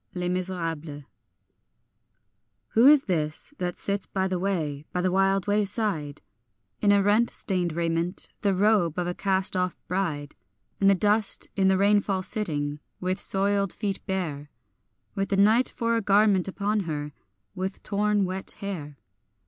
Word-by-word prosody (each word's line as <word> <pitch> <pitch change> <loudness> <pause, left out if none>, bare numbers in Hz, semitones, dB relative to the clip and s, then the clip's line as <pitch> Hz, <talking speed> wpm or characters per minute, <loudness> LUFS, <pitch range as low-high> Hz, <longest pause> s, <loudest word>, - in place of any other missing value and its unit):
Les 180 0 -2
Misérables. 165 -5 -4 1.6
WHO 230 +4 +5
is 290 -1 +7
this 155 - -2
that 180 -1 -3
sits 200 0 -2
by 190 -1 -1
the 185 -1 -2
way, 160 -7 -2
by 180 - -2
the 185 0 +1
wild 195 0 +2
wayside, 205 -7 -1 0.6
In 205 - +4
a 200 -1 +4
rent 215 +4 +3
stained 180 -4 -2
raiment, 170 +2 -1
the 200 -2 +1
robe 195 -5 +2
of 180 - 0
a 175 - -2
cast 190 0 +1
off 180 -1 0
bride, 160 -6 -2 0.5
In 195 - +3
the 195 - +6
dust, 210 +2 +1
in 190 -1 +2
the 190 0 +4
rainfall 200 -1 +2
sitting, 150 -9 -3 0.2
with 185 +1 -2
soiled 200 0 +2
feet 200 -2 -3
bare, 155 -7 -3 0.6
With 195 -1 -2
the 195 - +1
night 220 +5 +4
for 230 -1 -1
a 230 - +1
garment 200 -2 +3
upon 205 +2 -1
her, 150 -1 -4 0.4
with 190 0 -5
torn 205 0 +1
wet 190 +1 -4
hair? 155 -8 -6
190 Hz, 150 wpm, -26 LUFS, 175-205 Hz, 1.6 s, is